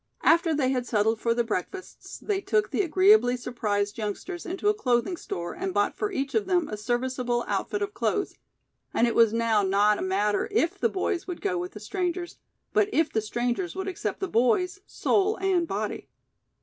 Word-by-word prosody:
After 335 0 +4
they 265 -3 +1
had 250 -2 -1
settled 220 0 +1
for 230 0 +1
their 240 - +2
breakfasts, 230 - -5
they 400 -2 -2
took 215 - 0
the - - +1
agreeably 370 - +4
surprised 210 -4 -2
youngsters 225 - -5
into 375 +3 -2
a 420 - +5
clothing 250 - 0
store 175 - -5
and 375 +1 -4
bought - - +1
for 415 - -2
each 275 -6 -3
of 420 -3 +1
them 355 -4 +2
a - - -3
serviceable 240 +2 -1
outfit 410 0 -1
of 405 +1 -4
clothes, 405 - -1 0.6
and 235 - +4
it 235 - +1
now 230 -1 +3
was 190 - -1
not 205 +2 +3
a - - -4
matter 205 +2 0
if 395 -2 +1
the 465 - +2
boys 370 -2 -2
would 360 -2 -5
go 180 - -1
with 180 +1 -5
the 210 - -8
strangers, 350 - -3 0.3
but 420 -1 +3
if 320 -3 +1
the 220 - +1
strangers 240 - -2
would 380 0 -4
accept 380 - -4
the 385 - 0
boys, 350 - +1
soul 415 +2 +1
and 370 -3 +1
body. 210 -2 -4
255 Hz, 195 wpm, -26 LUFS, -, 0.6 s, a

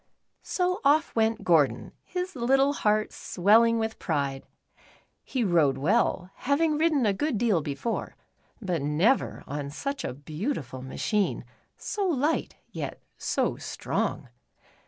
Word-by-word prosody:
So 365 +1 -1
off 300 +3 +3
went 225 0 +1
Gordon, 160 -5 +2
his 360 -1 -4
little 270 +3 +3
heart 215 -5 +1
swelling 225 +5 +3
with 225 0 -2
pride. 140 -5 -2 0.8
He 255 -3 -1
rode 160 -9 +3
well, 185 - +1
having 300 +3 +1
ridden 305 -4 +2
a 205 - +3
good 280 +4 -1
deal 210 -7 +2
before, 145 +11 -3 0.4
but 180 - -2
never 160 - +1
on 145 -1 -4
such 275 - -4
a - - -4
beautiful 150 - -4
machine, 200 - -1 0.3
so 405 -2 -2
light, 310 -1 0 0.2
yet - - -5 0.2
so - - -1
strong. - - -3
220 Hz, 125 wpm, -27 LUFS, -, 0.8 s, off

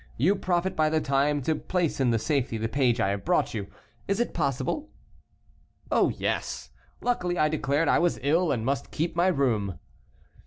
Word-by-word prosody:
You 175 - +3
profit 185 0 -1
by 155 -1 +3
the 160 0 +2
time 140 0 +1
to 160 - +1
place 170 0 -1
in 120 -4 +3
safety 130 -1 -1
the 110 +1 -1
page 125 -1 +1
I 95 - +2
have 100 0 -2
brought - - +1
you; 100 -3 -4 0.4
is 200 +2 0
it 240 - 0
possible?" 140 - -1 1.0
"Oh, - - +4
yes; - - -3 0.3
luckily 180 -8 0
I 155 -1 +3
declared 150 +1 0
I - - +4
was 175 0 +1
ill 160 +4 +2
and 115 -4 -1
must 135 -1 -1
keep 165 +2 -2
my 175 +2 +3
room." 115 - +1
145 Hz, 180 wpm, -27 LUFS, 125-175 Hz, 1.0 s, Oh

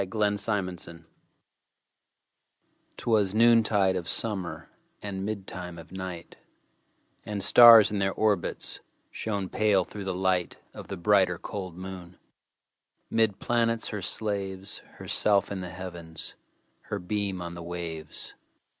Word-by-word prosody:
1827 100 -3 -2
Evening 85 0 -18
Star - - -35 1.9
'Twas 105 -4 +1
noontide 110 -4 +4
of 90 -2 -3
summer, 100 -6 -3 0.3
And 100 -2 -5
midtime 90 -4 -6
of 85 - -13
night, 95 -2 -7 0.9
And 105 -2 -4
stars, 115 -2 +9
in 105 - -1
their 95 0 +1
orbits, 105 -3 -1 0.3
Shone 100 -3 -3
pale, 100 -2 +2
through 100 -1 -8
the 95 -1 -2
light 95 -1 0 0.2
Of - - -9
the 100 - -5
brighter, 95 -1 +3
cold 95 -3 -6
moon. 90 -1 -8 0.9
'Mid 110 -3 +2
planets 115 -1 0
her 105 -2 -4
slaves, 100 0 -4 0.2
Herself 100 -2 +1
in 95 -2 -3
the 90 - -6
Heavens, 85 -3 -8 0.5
Her 105 - -3
beam 100 0 -2
on 85 -1 -6
the 85 - -8
waves. 85 -2 -7
95 Hz, 125 wpm, -28 LUFS, 90-105 Hz, 1.9 s, stars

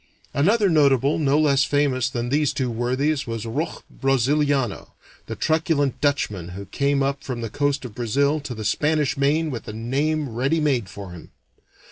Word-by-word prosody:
Another 200 +9 +3
notable 140 -4 +3
no 145 -1 +2
less 145 -3 +3
famous 135 -3 +1
than 120 -2 -3
these 145 +1 +1
two 130 -3 -1
worthies 130 +5 0
was 115 -1 -4
Roch 140 +9 -3
Braziliano, 135 -2 0 0.3
the - - -4
truculent 155 -3 0
Dutchman 105 - -1
who 100 - -7
came 140 +7 0
up 140 0 -2
from 125 -3 -4
the 115 -2 -5
coast 145 -2 0
of 120 - -8
Brazil 140 +7 +1
to 135 -4 -6
the 110 -1 -6
Spanish 150 +5 +1
Main 150 +3 +1
with 120 - -6
a 105 - -5
name 140 +7 -1
ready 130 +8 0
made 130 -10 0
for 100 0 -9
him. 90 -2 -11
140 Hz, 170 wpm, -23 LUFS, 120-150 Hz, 0.3 s, Another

